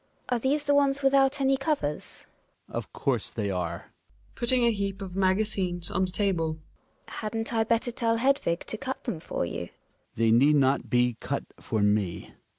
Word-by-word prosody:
Are 245 - +1
these 280 +5 +1
the 285 -1 +2
ones 280 -1 +2
without 275 +1 +4
any 270 0 +3
covers? 270 - -3 0.4
Hjalmar. - - -19
Of - - -4
course - - -1
they 100 -1 -2
are. 90 -3 -4
GiNA - - -34
{putting 245 +1 +1
a 235 - +4
heap 200 -2 -3
of 190 -2 -7
magazines 190 -2 0
on 190 - +1
the 180 - -5
table). 170 -6 0 0.5
Hadn't 225 +1 -4
1 225 -1 +2
better 235 +2 +1
tell 230 -1 0
Hedvig 255 -9 +1
to 220 - -5
cut 265 0 -5
them 160 - -3
for 155 - -3
you? 85 0 -5
Hjalmar. - - -39
They 115 0 +3
need 140 +6 +5
not 135 -1 +2
be 120 -1 +2
cut - - -3 0.2
for 110 -2 -1
me. 105 -4 0
200 Hz, 185 wpm, -27 LUFS, -, 0.5 s, need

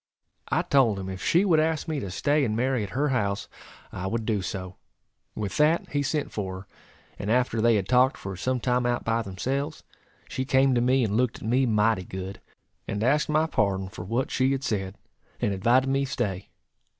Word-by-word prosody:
I - - +1
told 125 -7 +3
him 95 -1 -5
if 95 -1 -6
she 175 +4 +3
would 165 -5 +4
ask 160 0 0
me 155 -3 -1
to 100 - -5
stay 145 +10 +1
and 110 -4 0
marry 130 +1 +1
at 100 - -4
her 145 +1 +2
house, 100 -6 -1 0.4
I 90 - -4
would 115 +2 -2
do 105 -3 0
so. 95 -1 -5 0.6
With 100 -3 -3
that 155 +3 +3
he 145 - 0
sent 145 +1 -1
for 95 -3 -4
her, 95 - -17 0.5
and 100 - -3
after 120 -1 +2
they 115 0 +4
had 100 -3 0
talked 130 +3 +4
for 95 -1 -6
some 130 +7 -1
time 125 0 +1
out 120 0 0
by 115 +1 +1
themselves, 135 +9 -3 0.4
she 130 - -3
came 130 0 +3
to 120 - +2
me 130 +1 +3
and 105 -2 0
looked 125 -1 0
at - - -4
me 130 +3 +3
mighty 110 -2 +2
good, 95 +2 -7 0.5
and 105 - -2
asked 145 +6 +2
my 155 +1 +3
pardon 95 -10 0
for 95 -3 -8
what 115 +8 -2
she 130 +1 +2
had 135 0 -3
said, 100 -6 -2 0.4
and 100 - 0
invited 120 +7 +3
me 135 +1 +1
stay. 105 -8 -3
120 Hz, 210 wpm, -26 LUFS, 100-135 Hz, 0.6 s, would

